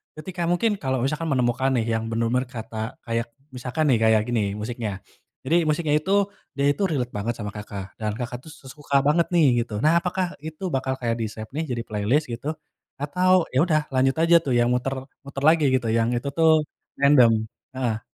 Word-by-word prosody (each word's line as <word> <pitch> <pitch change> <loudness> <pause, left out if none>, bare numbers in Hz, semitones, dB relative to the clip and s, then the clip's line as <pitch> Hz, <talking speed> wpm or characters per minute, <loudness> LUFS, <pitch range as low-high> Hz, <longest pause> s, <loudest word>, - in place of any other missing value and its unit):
ketika 175 +3 -7
mungkin 215 +5 +2
kalau 130 -4 -1
misalkan 150 +5 -1
menemukan 125 +1 +1
nih, 115 -2 +1
yang 110 0 -1
benar-benar 115 +3 0
kata 110 -1 -6
kayak 115 0 -2 0.3
misalkan 125 +5 -2
nih, 120 - +4
kayak 110 -1 +5
gini 120 -3 +1
musiknya. 110 0 -4 0.5
Jadi, 165 - +1
musiknya 155 0 +1
itu, 185 +5 -4 0.4
dia 140 0 +1
itu 175 - -4
relate 130 -7 -2
banget 115 +4 -1
sama 105 -2 -5
Kakak, 100 -1 -8
dan 105 -1 -2
Kakak 120 +1 -4
tuh, - - -9
se 135 - -14
suka 145 -1 -5
banget 165 +3 +3
nih, 165 - +5 0.2
gitu. 115 - -11
Nah, 165 +2 +5
apakah 185 +1 -1 0.2
itu 160 +4 -9
bakal 130 0 -1
kayak 115 -1 0
di-save 110 0 -5
nih 160 - -1
jadi 120 -1 -2
playlist, 110 +9 0
gitu? 120 +4 -6 0.5
Atau, 180 +4 +2
ya 130 - +2
udah, 155 -3 +2
lanjut 130 +1 +3
aja 165 +1 +5
tuh, 135 - 0
yang 120 0 +3
muter 125 +2 -1 0.3
muter 140 0 -6
lagi, 160 -2 +3
gitu, 125 -3 +1
yang 115 +2 +1
itu 120 +4 -2
tuh, 160 -1 +5 0.4
random? 140 -4 +6 0.4
Heeh. 120 -4 -2
130 Hz, 190 wpm, -24 LUFS, 115-155 Hz, 0.5 s, random